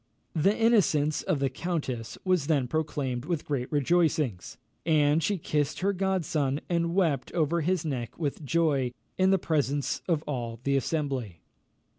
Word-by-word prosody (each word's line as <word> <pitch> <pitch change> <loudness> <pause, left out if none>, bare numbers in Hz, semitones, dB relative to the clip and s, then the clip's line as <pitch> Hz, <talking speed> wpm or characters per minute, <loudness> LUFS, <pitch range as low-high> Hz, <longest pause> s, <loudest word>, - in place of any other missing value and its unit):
The 195 +6 +2
innocence 185 -10 +3
of 185 -5 0
the 135 -1 0
countess 130 -9 -3
was 180 -6 +2
then 140 -6 +2
proclaimed 140 -4 -2
with 165 -2 -2
great 130 -4 -2
rejoicings; 150 - +1 0.3
and 150 -1 +3
she 200 +5 0
kissed 150 -2 -1
her 200 +2 +2
godson, 165 -7 0
and 170 0 0
wept 160 -9 +1
over 165 0 +1
his 175 +1 0
neck 130 -6 -4
with 150 -1 -3
joy, 140 -5 +1 0.3
in 185 0 +5
the 195 - +5
presence 145 -5 0
of 160 -4 +1
all 120 -5 -4
the 140 0 +1
assembly. 135 - -2
150 Hz, 150 wpm, -28 LUFS, 135-170 Hz, 0.3 s, in